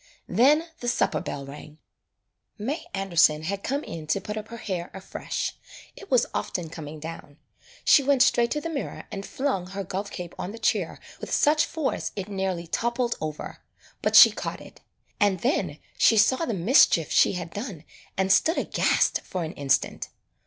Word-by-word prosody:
Then 285 - +4
the 240 - -5
supper 240 - +1
bell 140 -1 -5
rang. 150 +2 -11 0.8
May 265 +10 -4
Anderson 170 -5 +3
had 195 +4 -3
come 280 +7 -2
in 160 -2 -7
to 155 +6 +1
put 210 +2 -6
up 215 0 -6
her 235 - -8
hair 185 -6 -4
afresh 190 - -4 0.2
— - - -18
it 400 - -12
was 250 -2 +4
often 170 -3 -3
coming 155 -2 -8
down. 155 -2 -9 0.5
She - - +7
went 275 -1 +4
straight 235 -3 +3
to 300 - -2
the 330 - -4
mirror 285 -4 -5
and 195 - -5
flung 200 -7 -2
her 195 +1 -5
golf 195 +2 -4
cape 175 -3 -7
on 190 - -4
the - - -8
chair - - 0 0.2
with - - -7
such 300 +1 +3
force 310 -4 -2
it 195 0 -5
nearly 190 -3 -2
toppled 235 +6 -1
over, 155 -1 -5 0.4
but - - +1
she - - +11
caught - - -5
it. - - -14 0.4
And 200 -5 +2
then 265 +7 0 0.2
she 225 - +5
saw 260 +9 +4
the 235 - -2
mischief 175 - +4
she - - +4
had 175 -2 -6
done 200 - -6 0.3
and 190 0 +1
stood 325 - +4
aghast - - +1
for 185 -2 -4
an 160 - -5
instant. 140 -2 0
195 Hz, 180 wpm, -26 LUFS, 170-245 Hz, 0.8 s, she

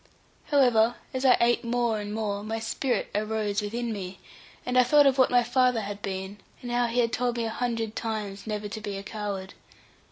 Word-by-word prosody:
However, 240 -5 +4 0.2
as 260 +1 -2
I 255 - +7
ate 235 +1 +3
more 235 -2 0
and 205 0 -5
more, 210 -2 -2
my 220 +2 -3
spirit 230 +3 -2
arose 210 0 -1
within 230 +3 -3
me, 190 -2 -6 0.5
and 250 - -2
I 255 - +8
thought 290 +4 +5
of 270 -1 +3
what 260 - +6
my 245 -1 +4
father 250 -1 +2
had 205 0 -6
been, 190 +1 -5 0.2
and 245 - -5
how 240 0 +2
he 240 +1 +1
had 230 -1 0
told 245 -1 0
me 230 - -1
a 225 - -2
hundred 230 -2 -2
times 210 -3 -4
never 210 -1 -3
to 220 +1 -6
be 205 -1 -4
a 195 - -6
coward. 200 -2 -5
225 Hz, 210 wpm, -27 LUFS, 205-245 Hz, 0.5 s, I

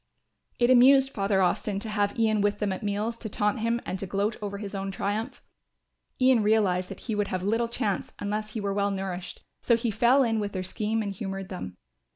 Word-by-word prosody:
It 240 +1 +3
amused 270 +2 +6
Father 195 -3 +1
Austin 195 +3 0
to 220 - -4
have 205 0 0
Ian 220 -2 +2
with 205 0 +1
them 205 -2 -1
at 185 - -6
meals 210 +3 -2
to 220 - -6
taunt 210 +3 0
him 230 +1 0
and 185 - -4
to 195 - -4
gloat 200 +3 0
over 200 -1 -4
his 200 0 -6
own 195 0 -3
triumph. 205 +6 -3 0.8
Ian 255 -3 +5
realised 200 -4 +2
that - - -9
he 225 - -4
would 205 -1 0
have 185 -1 -3
little 225 +4 +1
chance 210 -4 -2
unless 210 +1 -3
he 225 - -3
were 200 -1 -2
well 200 0 +1
nourished, 190 -2 -5 0.2
so 235 - +3
he 230 -1 -1
fell 240 +6 +4
in 225 -2 +1
with 205 -1 -3
their 185 -1 -3
scheme 215 +4 -1
and 200 -1 -3
humoured 195 -1 -5
them. 95 - -7
205 Hz, 215 wpm, -27 LUFS, 195-225 Hz, 0.8 s, amused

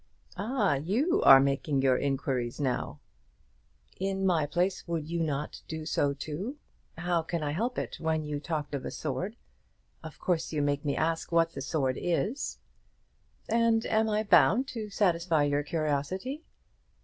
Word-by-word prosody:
"Ah! 215 - +1
you 250 - +1
are 135 - +9
making 140 0 +1
your 130 -1 +4
inquiries 135 -3 -1
now." 130 -4 -2 1.0
"In 195 0 -1
my 165 -5 +2
place 180 +5 -1
would 165 -3 -2
not 155 -4 -2
you 160 - -3
do 155 - -7
so 145 -2 +1
too? 175 - -5 0.4
How 175 0 +1
can 165 0 -3
I 145 - -1
help 230 +11 -2
it - - -3
when 160 -1 0
you 150 -1 -3
talked 150 -1 -4
of 140 - -3
a - - -4
sword? 160 - -4 0.7
Of 160 -1 -9
course 170 -3 -1
you 150 -2 0
make 145 0 0
me 145 -2 0
ask 165 +1 -1
what 165 0 +3
the 135 - -6
sword 135 -2 -1
is." 200 - -1 0.9
"And 230 0 +2
am 220 0 +2
I 215 0 +1
bound 225 +4 +5
to 220 -3 -5
satisfy 170 -6 +2
your 145 0 +1
curiosity?" 160 - -2
165 Hz, 160 wpm, -29 LUFS, 145-195 Hz, 1.0 s, are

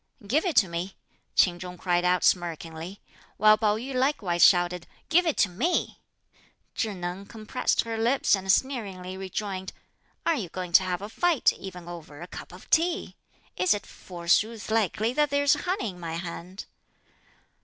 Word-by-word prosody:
"Give 295 - +1
it 335 - -1
to 195 - +5
me," 175 +3 -4 0.4
Ch'in 175 -2 +4
Chung 180 0 -8
cried 175 -1 +1
out 180 0 +2
smirkingly; 170 +1 -1 0.4
while 215 +1 +7
Pao 215 -1 +1
yü 260 +4 -6
likewise 255 -10 +1
shouted: 175 -1 +4 0.2
"Give 350 +2 +4
it 320 - 0
to - - +4
me." 245 - -1 0.7
Chih 215 -3 -2
Neng 180 +2 -5
compressed 215 -2 -1
her 225 -1 -4
lips 240 +4 +2
and 190 0 0
sneeringly 195 -7 -1
rejoined, 190 0 -4 0.5
"Are 335 - +3
you 220 - -3
going 180 0 -5
to 170 - +7
have 185 +1 -3
a - - -4
fight 335 +4 +2
even 180 -3 -9
over 160 -4 -9
a 175 - -7
cup - - -10
of 180 +1 -13
tea? 330 - +1 0.4
Is 185 +3 +3
it 205 - -6
forsooth 195 +6 -1
likely 220 +1 +1
that 295 +1 +2
there's 285 0 +3
honey 360 - -2
in 180 - -14
my 165 -2 -5
hand?" 175 +3 -6
190 Hz, 165 wpm, -27 LUFS, 175-230 Hz, 0.7 s, while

